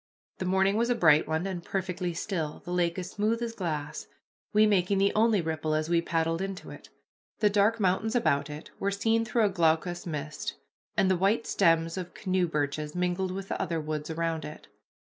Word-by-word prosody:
The 185 - -2
morning 190 +2 +2
was 235 +1 +1
a 245 - +3
bright 155 -7 +5
one, 160 +3 -1
and 185 -3 -4
perfectly 180 -2 -2
still, 165 -4 -3
the 175 - -5
lake 175 -1 +1
as 185 0 -5
smooth 215 +3 0
as 230 -1 -3
glass, 155 -8 -4 0.4
we 215 0 +5
making 195 -2 +2
the 195 +1 +3
only 220 -2 +3
ripple 155 -1 -1
as 155 +1 -1
we 170 -1 +3
paddled 165 0 0
into 195 -1 -5
it. - - -12 0.5
The 210 -2 +3
dark 210 +3 +3
mountains 210 +4 +1
about 145 -12 +2
it 150 +1 -8
were 200 - 0
seen 225 +3 +1
through 230 -1 +2
a - - +3
glaucous 175 0 +1
mist, 150 -1 -4 0.4
and 190 - +4
the - - +4
white 200 +5 +2
stems 165 -2 +2
of 180 -1 -6
canoe 185 -2 0
birches 150 0 -2
mingled 180 +1 0
with 195 +1 -5
the - - -2
other 165 0 -1
woods 155 0 -4
around 165 0 -2
it. 150 - -9
180 Hz, 200 wpm, -28 LUFS, 160-200 Hz, 0.5 s, bright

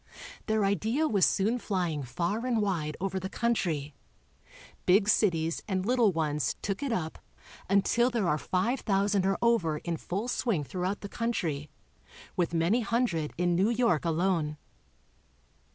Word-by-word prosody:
Their 215 -2 +2
idea 225 +10 +1
was 200 -8 +3
soon 220 +5 +1
fly 185 -6 -1
ing 150 -2 -3
far 170 - -2
and 235 -3 +1
wide 170 -7 -1
over 190 +1 -2
the 190 +1 -5
country. 170 -12 -1 0.9
Big 195 +3 +5
cities 165 -7 +2
and 190 -2 -1
little 240 -3 +3
ones 150 -5 -1
took 195 +3 -2
it 280 -3 -2
up 160 -8 -2 0.5
until 215 +5 +3
there 230 -7 0
are 155 -3 +1
five 230 - 0
thousand 200 -1 +1
or 195 - +1
over 190 -10 +2
in 170 +1 -3
full 195 +9 -3
swing 230 - 0
throughout 185 +6 -3
the 200 - -5
country, 170 -11 -2 0.7
with 175 -2 0
many 170 +8 +2
hundred 220 -9 0
in 175 0 +1
New 190 +5 +3
York 235 -9 +2
alone. 165 -2 0
190 Hz, 150 wpm, -29 LUFS, 165-225 Hz, 0.9 s, Big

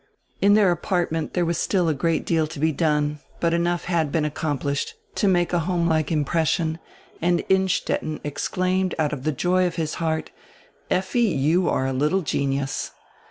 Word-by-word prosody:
In 205 +1 +6
their 205 -4 +5
apartment 170 -2 -1
there 175 -1 +2
was 170 0 -1
still 180 -4 +1
a 160 - +2
great 165 +3 0
deal 160 -2 +1
to 150 - -9
be 160 +2 +2
done, 150 -1 0 0.2
but 170 -1 +1
enough 170 0 0
had 165 -4 0
been 155 -1 +1
accomplished 145 -2 -2 0.2
to 205 - +1
make 175 -2 +2
a 175 - +3
homelike 170 -3 0
impression 160 +1 0 0.4
and 175 +1 +1
Innstetten 190 -4 +1
exclaimed 185 +5 -1
out 150 -2 0
of 140 - -4
die - - +2
joy 180 +5 +2
of 175 - -5
his 160 -2 -2
heart: 160 -1 -1 0.6
"Effi, 190 +6 0
you 170 - +2
are 130 - 0
a 135 - -1
little 150 +9 +1
genius." 135 -1 -1
165 Hz, 170 wpm, -23 LUFS, 150-180 Hz, 0.6 s, In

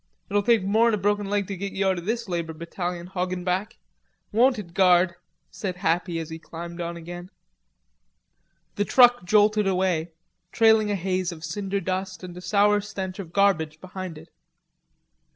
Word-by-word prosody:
"It'll 205 0 +3
take 225 -1 +3
mor'n 220 +3 +3
a - - -3
broken 205 0 0
leg 205 -1 0
to 195 - -5
git 195 +2 -5
you 195 0 0
out 190 -2 +1
o' - - -7
this 230 +5 -2
labor 170 -3 -3
battalion, 175 +2 -5
Hoggenback. 180 +1 -2 0.5
Won't 245 +4 +4
it, 175 -5 -8
guard?" 180 -1 +4 0.4
said 185 -3 -4
Happy, 175 0 0
as 165 0 -5
he 160 - -6
climbed 170 +1 -8
on 170 0 -4
again. 175 +2 -8 1.5
The 205 - +2
truck 245 -4 +5
jolted 210 +2 +3
away, 180 -3 0 0.4
trailing 220 -1 +4
a 205 - +1
haze 185 -1 -1
of 160 -2 -10
cinder 195 +4 -2
dust 185 0 -4
and 180 -1 -8
a 180 - -8
sour 205 +3 +3
stench 190 -2 -6
of 175 -4 -7
garbage 170 -6 +2
behind 185 -2 -7
it. 160 +2 -13
185 Hz, 170 wpm, -25 LUFS, 175-205 Hz, 1.5 s, truck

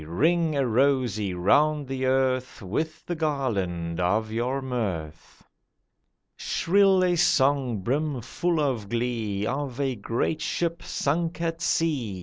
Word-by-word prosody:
Ring 160 - +1
a 140 -1 +1
rosy 120 -6 +1
round 145 +11 +3
the 130 0 -2
earth 130 -1 0
With 155 - -3
the 175 - -3
garland 100 - -2
of 105 +5 +1
your 125 +4 -1
mirth. 100 - -5 0.9
Shrill 195 +1 +3
a 180 -1 +2
song 135 - +2
brim 140 +5 -1
full 170 +7 -1
of 125 -9 -1
glee 115 -4 -2
Of 135 +1 -3
a 135 -2 0
great 115 +8 -2
ship 170 0 -2
sunk 165 +4 -1
at 165 0 -2
sea. 145 - 0
130 Hz, 130 wpm, -26 LUFS, 110-155 Hz, 0.9 s, round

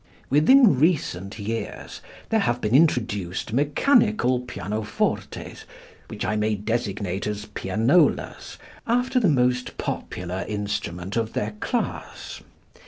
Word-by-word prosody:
Within 155 - +6
recent 115 - 0
years 110 +2 -5 0.3
there 225 - +3
have 120 - 0
been 105 -1 -1
introduced 110 - +1
mechanical 150 - +3
pianofortes, 110 -3 -3 0.4
which - - -5
I 105 - 0
may 105 0 +1
designate 100 -3 -2
as 105 -1 -4
pianolas, 115 - +1 0.3
after 250 +2 +2
the 210 -7 +3
most 125 -3 +1
popular 90 +1 -4
instrument 100 -2 -3
of 115 -1 -1
their 105 +1 -2
class. - - -4
115 Hz, 105 wpm, -24 LUFS, 105-145 Hz, 0.4 s, Within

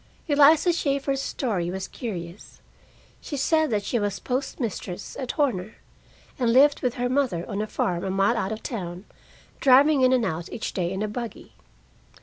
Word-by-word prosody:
Eliza 300 +3 +5
Shaeffer's 275 -3 -1
story 200 -12 -2
was 190 +1 -4
curious. 180 -5 -7 0.6
She 290 - -5
said 315 +3 +2
that 210 -3 0
she 235 - -1
was 205 -1 -1
postmistress 245 -8 -4
at 255 -2 -3
Horner, 215 -9 -1 0.6
and 240 -2 +2
lived 280 +4 +5
with 250 -2 -1
her 245 0 -1
mother 245 -10 0
on 205 -1 -3
a 215 - -3
farm 175 -4 -1
a 195 - -2
mile 195 +4 +2
out 200 -3 -2
of 220 0 -5
the - - -3
town, 180 -4 -6 0.5
driving 275 +2 +5
in 255 0 +5
and 250 -3 +3
out 170 -2 -4
each 225 - -4
day 175 -2 -1
in 190 +2 -2
a - - -1
buggy. 235 +2 -7
235 Hz, 175 wpm, -25 LUFS, 190-275 Hz, 0.6 s, Eliza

